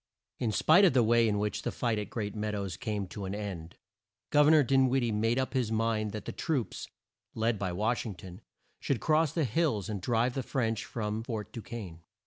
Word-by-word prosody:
In 115 - 0
spite 160 - +5
of 185 - +6
the 125 -2 +4
way 115 +1 +4
in 105 -1 +1
which 105 +1 -1
the - - -2
fight 115 -3 -1
at 105 - -5
Great 105 -3 -4
Mead 105 -1 -3
ows 100 -3 -3
came 105 0 -3
to 100 +1 -6
an 95 +1 -4
end 95 -5 -6 0.5
Gov 150 0 +5
er - - +7
nor 155 -2 +6
Din 135 0 +3
wid 130 0 +2
die 115 - 0
made 115 +3 +1
up 130 +1 -1
his 125 -4 0
mind 110 -1 0
that 105 -1 -6
the - - -4
troops, 145 -9 -2 0.5
led 115 -1 0
by 95 -2 -2
Wash 110 +7 0
ing 105 -4 -6
ton, 90 +3 -11 0.4
should 135 - -1
cross 155 -1 +2
the 165 0 0
hills 115 - 0
and 100 -3 -3
drive 120 +4 +1
the 135 - -2
French 115 -4 -1
from 110 -1 -3
Fort 110 -3 -5
Du 115 - -6
quesne. 100 -8 -8
110 Hz, 230 wpm, -30 LUFS, 105-125 Hz, 0.5 s, er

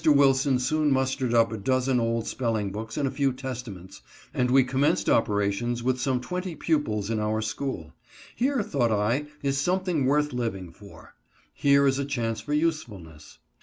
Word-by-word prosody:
Wilson 140 -3 +4
soon 150 +4 +1
mustered 130 -2 0
up 115 -1 +3
a 110 - -4
dozen 130 +3 +1
old 115 -1 -1
spelling 110 -5 -2
books 110 +3 -6
and 140 - +1
a - - -2
few 140 0 +1
Testaments, 115 -8 -8 0.3
and 125 0 +1
we 135 +1 +5
commenced 135 +3 +1
operations 110 +3 +1
with 130 0 0
some 130 -1 +1
twenty 180 +6 -4
pupils 140 -10 -1
in 110 - 0
our 105 +1 0
school. 110 - -4 0.4
Here, 260 -2 +1
thought 120 - 0
I, 115 +8 0 0.2
is 140 -1 0
something 180 -3 0
worth 150 0 +1
living 100 -8 -3
for. 85 -3 -15 0.4
Here 140 0 +4
is 135 0 +2
a 140 - -1
chance 115 -5 -2
for 145 - -7
usefulness. 100 - -3
125 Hz, 165 wpm, -26 LUFS, 110-140 Hz, 0.4 s, we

